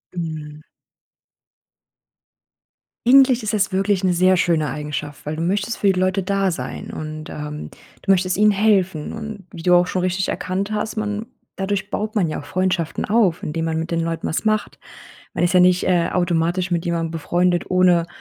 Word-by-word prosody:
Mhm. 155 -3 -5 2.5
Eigentlich 260 -1 +6
ist 215 +1 -3
es 200 -2 +1
wirklich 195 0 +1
'ne 185 -1 +3
sehr 185 +1 +4
schöne 160 -4 +1
Eigenschaft, 150 +1 -5
weil 150 +1 -3
du 160 - -4
möchtest 200 +6 -1
für 200 - +2
die 185 - -1
Leute 185 +1 +1
da 195 0 0
sein. 170 - -6
Und, 155 0 -7
ähm, 150 0 -6 0.3
du 195 - +3
möchtest 185 0 +2
ihnen 210 0 +5
helfen 195 -6 +1
und 220 -2 -7
wie 165 - -9
du 180 - +4
auch 175 0 +5
schon 185 -1 -1
richtig 185 +1 0
erkannt 195 +3 -2
hast 215 +1 -3
man 210 0 -2 0.3
dadurch 195 +1 -2
baut 215 +1 -3
man 195 -6 +2
ja - - -3
auch - - -10
Freundschaften 180 +1 -1
auf, 205 -6 +2
indem 160 +2 -2
man 160 -1 -1
mit 160 +1 -3
den 170 - 0
Leuten 165 0 -2
was 160 - -2
macht. 215 -1 0 0.5
Man - - 0
ist 175 +1 +1
ja 180 - +7
nicht, 180 0 +4
äh, 175 -2 +2
automatisch 175 +1 0
mit 170 -1 0
jemandem 170 -2 -1
befreundet, 175 +2 0
ohne 180 -2 +4
180 Hz, 185 wpm, -21 LUFS, 165-195 Hz, 2.5 s, ja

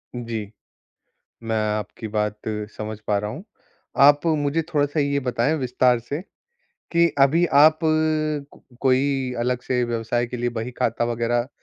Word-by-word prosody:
जी। 115 -4 -5 0.9
मैं 115 0 -2 0.2
आपकी 105 +2 -6
बात 105 0 -1 0.4
समझ 110 0 -5
पा 105 -1 +2
रहा 105 +1 -3
हूँ। 160 - -8 0.6
आप 145 +2 +6
मुझे 145 +3 0
थोड़ा-सा 145 +1 +1
ये 140 0 +1
बताएँ 125 +2 0
विस्तार 125 -2 +2
से, 145 +8 -5 0.7
कि 170 0 +5
अभी 155 +6 +5 0.2
आप 155 +1 +6 1.0
कोई 130 0 +1
अलग 125 +1 0
से 125 -1 0
व्यवसाय 120 +1 -1
के 125 +1 -6
लिए 120 0 -1
बही 115 +3 -4
खाता 120 -1 0
वग़ैरह 120 +1 -1
125 Hz, 140 wpm, -23 LUFS, 115-140 Hz, 1.0 s, आप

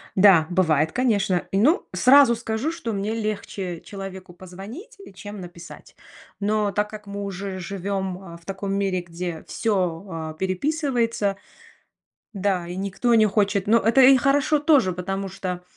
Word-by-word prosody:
Да, 185 -5 +6
бывает, 160 -4 +2
конечно. 205 -8 +1
И, 195 - 0
ну, 295 - +3
сразу 265 -2 +6
скажу, 225 +5 -2
что 235 -9 -5
мне 205 +2 -2
легче 200 -5 -4
человеку 190 -2 -9
позвонить, 195 - -11 0.2
чем 205 0 -8
написать. 175 -1 -12 0.4
Но 210 0 0
так 210 +1 -1
как 210 -1 -10
мы 200 0 -5
уже 195 -1 -5
живем, 190 0 -3
а, 170 -3 -10
в 170 - -23
таком 195 +1 -4
мире, 195 -2 0
где 175 -1 -6
всё, 185 -5 -1
а, 160 -2 -5
переписывается, 230 - -1 1.0
да, 195 -4 -1
и 175 +1 -6
никто 200 +5 0
не 220 -1 +5
хочет, 200 -1 +1
но 225 +3 +5
это 230 +4 +3
и 265 +1 +8
хорошо 285 +4 +2
тоже, 285 - +3
потому 195 +2 -4
что, 185 -2 -5
200 Hz, 150 wpm, -23 LUFS, 185-225 Hz, 1.0 s, и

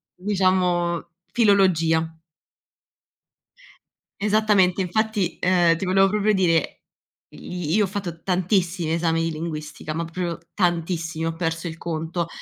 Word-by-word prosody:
diciamo 180 -3 +1 0.2
filologia. 165 -7 +3 2.1
Esattamente. 205 -3 +3
Infatti, 210 0 -1
ehm, 175 -2 +4
ti 165 - -5
volevo 195 +1 +4
proprio 210 +1 +1
dire: 165 -5 +1 0.5
i 175 -3 -5
io 215 - +4
ho - - 0
fatto 180 -4 -5
tantissimi 180 -3 0
esami 165 -1 +1
di 165 - -1
linguistica, 155 -1 -5
ma 165 +1 -2
proprio 170 0 -4 0.2
tantissimi, 165 -3 -1
ho 165 - -1
perso 165 0 -2
il 165 0 -7
conto. 165 +1 -3
175 Hz, 115 wpm, -23 LUFS, 165-190 Hz, 2.1 s, ehm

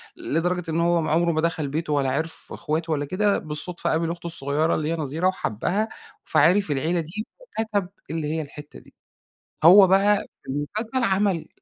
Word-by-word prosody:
لدرجة 180 - -2
إن 160 - 0
هو 170 0 +2
م 155 - -2
عُمره 170 +2 +2
ما 155 -1 0
دخل 165 -3 -1
بيته 150 +2 -2
ولا 140 -2 +1
عرف 160 +4 -4
إخواته 165 0 -2
ولا 145 -1 -1
كده. 200 +6 +1
بالصدفة 155 +2 -3
قابل 165 +1 0
أخته 170 0 -6
الصغيرة 155 0 0
اللي 155 0 -2
هي - - 0
نظيرة 160 +3 -1
وحبّها، 190 - -1 0.3
فعِرف 185 +1 +3
العيلة 160 +5 0
دي 170 +7 -5
وكَتَب 220 - -3 0.2
اللي 160 -2 -3
هي 160 - -1
الحتّة 145 0 -10
دي. - - -21 0.7
هو 190 +4 +9
بقى 200 +2 +3 0.2
المسلسل 215 - -2
عمل 195 -5 +1
165 Hz, 170 wpm, -24 LUFS, 155-190 Hz, 0.7 s, هو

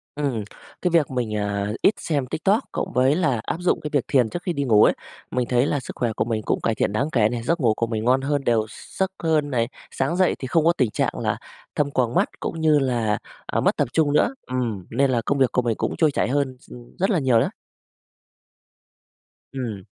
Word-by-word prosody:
Ừm. 135 -7 -1 0.4
Cái 180 - +2
việc 165 -5 +3
mình, 120 -4 -2
à, 100 0 -1
ít 210 - +5
xem 145 -5 -1
TikTok, 200 - +1
cộng - - -3
với 130 +4 +3
là 145 -10 +1
áp - - -2
dụng 180 - +1
cái 150 - -5
việc 140 -4 +2
thiền 125 -4 +3
trước 175 - -5
khi 180 - -1
đi 140 -3 -2
ngủ 110 -5 +5
ấy, - - +4 0.4
mình 125 -1 -1
thấy 125 +2 +3
là 145 - 0
sức - - -9
khỏe 120 -2 0
của 110 - -1
mình 110 -2 -2
cũng - - -1
cải 115 - 0
thiện 100 - 0
đáng 140 +8 0
kể 110 -6 +3
nè, 120 0 -3
giấc 170 +6 0
ngủ 115 -4 +3
của 115 - -1
mình 110 -1 -3
ngon 130 +2 +3
hơn, 140 0 -1
đều 115 -3 +3
gi - - -12 0.2
giấc 190 0 +1
hơn 155 -3 +1
này, 115 -3 0 0.2
sáng 140 +6 -1
dậy 185 -1 +3
thì 130 - -5
không 155 +4 +2
có 170 - +5
tình 125 -5 +2
trạng - - -1
là - - -1 0.4
thâm 145 -1 0
quầng 125 -3 0
mắt - - +3
cũng 165 - -4
như 155 -2 +4
là, 120 -6 0 0.3
à, - - 0
mất - - +2
tập - - +1
trung 150 -3 +2
nữa, 235 - +3
ừm, 120 -7 -2
nên 135 +3 +2
là 120 - +2
công 140 - +1
việc 130 -2 +3
của 125 - +2
mình 115 -2 0
cũng - - -2
trôi 155 -3 +4
chảy - - 0
hơn 130 -1 0
s - - -22
ừm, 120 -1 -13
rất 195 +4 +1
là 185 - +2
nhiều 130 -5 +3
đó. - - 0 2.0
Ừm. 115 -8 -5
130 Hz, 245 wpm, -23 LUFS, 115-150 Hz, 2.0 s, ít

